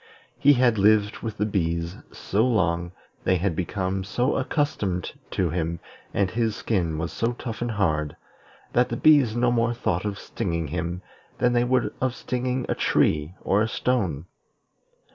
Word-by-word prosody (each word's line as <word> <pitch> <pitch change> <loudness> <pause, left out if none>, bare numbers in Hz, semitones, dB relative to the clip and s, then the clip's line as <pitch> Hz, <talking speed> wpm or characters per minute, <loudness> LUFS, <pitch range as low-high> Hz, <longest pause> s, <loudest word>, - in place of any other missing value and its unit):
He 145 - +6
had 120 -4 +3
lived 105 +1 +3
with 110 -2 -5
the 105 - +1
bees 85 -4 -1 0.2
so 105 +3 0
long, 85 -8 +1 0.3
they 95 - +3
had 90 -1 0
become 95 +2 -2
so 120 +7 0
accustomed 100 - -1 0.2
to 90 -4 0
him, 85 0 -2 0.3
and 95 -2 0
his 115 -1 0
skin 85 -9 -1
was 80 +2 -3
so 115 +1 0
tough 120 -2 -6
and 120 - -1
hard, 80 -9 0 0.6
that 125 +1 +3
the - - -2
bees 140 -8 +5
no 120 0 +2
more 120 0 +1
thought 105 -6 -1
of 105 -2 -3
stinging 85 -6 -3
him 85 +3 -3 0.3
than 125 0 +2
they 120 0 +3
would 125 0 +1
of 130 -1 0
stinging 125 0 -2
a - - +1
tree 75 +3 +1
or 100 +2 +2
a 110 - +2
stone. 95 - -1
105 Hz, 165 wpm, -25 LUFS, 85-120 Hz, 0.6 s, He